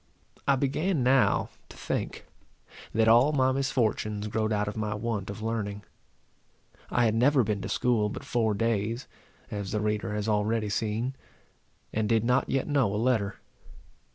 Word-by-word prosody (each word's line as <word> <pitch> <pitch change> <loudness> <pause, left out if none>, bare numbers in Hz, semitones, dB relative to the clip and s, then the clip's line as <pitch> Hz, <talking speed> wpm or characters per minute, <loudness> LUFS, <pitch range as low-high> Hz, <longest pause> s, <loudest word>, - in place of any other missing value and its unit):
I 140 - +5
began 145 +4 0
now 130 +1 +3 0.2
to - - -13
think, - - -3 0.7
that 110 +1 +2
all 120 +6 +6
my 130 -2 +3
misfortunes 110 -6 -1
growed 110 +1 -1
out 105 -1 0
of 100 - -4
my 110 -1 -2
want 105 -3 -3
of 100 +2 -6
learning. 105 -3 -3 1.1
I 120 - +2
had 110 - +2
never 130 +3 +4
been 105 -2 -1
to - - -5
school 115 -4 +1
but - - -7
four 110 -3 +1
days, 115 +2 -1 0.4
as 100 -2 -4
the 105 - 0
reader 105 0 -1
has 105 0 -2
already 105 0 +1
seen, 110 +5 -1 0.8
and 110 -1 0
did 115 -1 +3
not 125 +2 +2
yet 135 - 0
know 140 -8 +2
a 105 - -1
letter. 110 -4 +1
110 Hz, 160 wpm, -28 LUFS, 105-125 Hz, 1.1 s, all